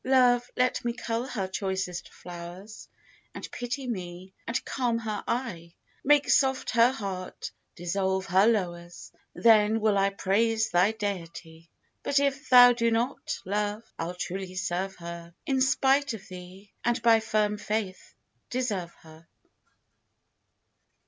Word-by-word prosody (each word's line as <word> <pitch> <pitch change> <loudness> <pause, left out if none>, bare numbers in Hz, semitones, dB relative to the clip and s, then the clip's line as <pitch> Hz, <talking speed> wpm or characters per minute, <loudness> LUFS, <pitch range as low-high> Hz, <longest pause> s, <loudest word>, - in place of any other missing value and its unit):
Love, 245 -2 +4
let 250 0 +1
me 240 - 0
cull 235 +1 -3
her 200 -7 -3
choicest 190 -2 -3
flowers, 175 +4 -10 0.5
And - - -7
pity 250 +2 -4
me, 185 -4 -6
and 230 - -2
calm 245 -3 0
her 215 -3 -4
eye; 185 -9 -3 0.3
Make 290 +1 +4
soft 265 -1 +2
her 235 +2 +5
heart, 195 -7 -6 0.2
dissolve 190 +2 -1
her 190 +4 +4
lowers, 175 -6 -2 0.2
Then 220 -1 +5
will 210 -2 +2
I 195 0 +3
praise 220 +3 +1
thy 180 +5 +3
deity, 170 -5 -6 0.3
But 280 - 0
if 275 -1 0
thou 245 -1 +9
do 230 -1 +1
not, 235 +4 -1
Love, 210 +2 -2 0.2
I'll 170 +2 -3
truly 185 +1 -5
serve 185 +1 -2
her 170 0 -9
In 265 -1 +1
spite 270 0 +2
of 215 -1 -12
thee, 185 +2 -11
and 240 +1 +1
by 230 -1 +6
firm 215 -1 0
faith 205 -3 -4 0.3
deserve 205 -9 -2
her. 160 +1 -16
210 Hz, 135 wpm, -27 LUFS, 185-240 Hz, 0.5 s, thou